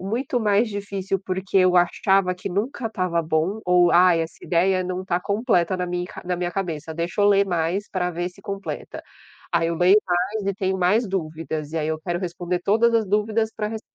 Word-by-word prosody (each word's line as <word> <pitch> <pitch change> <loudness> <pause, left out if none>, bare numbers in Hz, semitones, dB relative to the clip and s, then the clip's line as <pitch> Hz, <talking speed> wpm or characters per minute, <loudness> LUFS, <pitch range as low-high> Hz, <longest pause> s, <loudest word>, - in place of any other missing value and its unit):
muito 250 -1 -1
mais 210 +1 +2
difícil 200 -2 -3
porque 190 +1 -1
eu 185 -1 +4
achava 180 +1 +3
que 180 +2 -6
nunca 225 +5 -2
estava 185 -5 -1
bom 160 +6 -1
ou: 180 -1 +4
"Ah, 180 0 +6
essa 165 0 -3
ideia 185 +2 +2
não 185 0 -3
está 180 -1 -1
completa 200 -3 +1
na 180 - -1
minha 180 0 -3 0.2
na 180 0 -1
minha 175 0 -3
cabeça. 165 -5 -4
Deixa 170 +5 -2
eu - - +5
ler 200 0 +4
mais 175 +3 -1
para 180 -2 -1
ver 175 +1 -3
se 180 - -19
completa.". 195 0 -6 0.5
Aí, 165 - +2
eu 170 - -1
leio 180 +4 +5
mais 185 +4 -1
e 200 - +1
tenho 190 0 -1
mais 205 +6 +2
dúvidas, 160 -4 -4
e 165 - -2
aí 155 0 -1
eu 160 0 -2
quero 175 +1 -2
responder 175 0 -3
todas 230 +4 +3
as 220 -2 +2
dúvidas 215 +2 +1
para 210 -1 -2
res 220 0 -5
185 Hz, 205 wpm, -23 LUFS, 175-200 Hz, 0.5 s, Ah